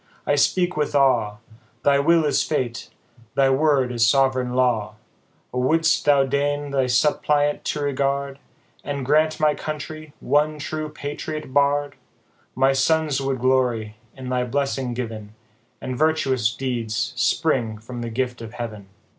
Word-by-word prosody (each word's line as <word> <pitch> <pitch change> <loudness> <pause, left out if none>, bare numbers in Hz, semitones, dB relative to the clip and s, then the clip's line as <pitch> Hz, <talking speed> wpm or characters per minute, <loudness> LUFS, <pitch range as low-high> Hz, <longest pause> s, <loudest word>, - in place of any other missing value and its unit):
I - - +2
speak 175 +5 +2
with 150 -1 -1
awe, 120 -7 +2 0.5
Thy 140 -1 +4
will 165 +2 +3
is 145 - +2
fate, 125 -6 -2 0.5
thy 135 -1 +4
word 135 -2 +2
is 115 -2 +3
sovereign 130 -2 +2
law! 115 -5 +1 0.6
O, 125 - -1
wouldst 160 +5 +2
thou 140 -2 +4
deign 145 +1 -1
thy 135 -2 +1
suppliant 145 +3 +1
to 150 - -2
regard, 140 0 -1 0.4
And 140 -2 -4
grant 155 +3 +2
my 155 -1 +3
country 155 0 -7
one 150 +1 +1
true 155 +1 -4
Patriot 150 -1 -6
Bard, 145 +1 +2 0.6
My 135 +1 +3
sons 150 0 +1
would 135 -2 -2
glory 125 -5 +1 0.2
in 130 -1 -7
the 125 -1 0
blessing 135 -1 -2
given, 110 -3 -6 0.4
And 130 - -5
virtuous 135 -6 +1
deeds 120 -4 -3
spring 125 -9 0
from 120 +3 -8
the 120 - -4
gift 125 0 -3
of 115 0 -8
heaven 110 -5 -7
135 Hz, 145 wpm, -22 LUFS, 125-145 Hz, 0.6 s, Thy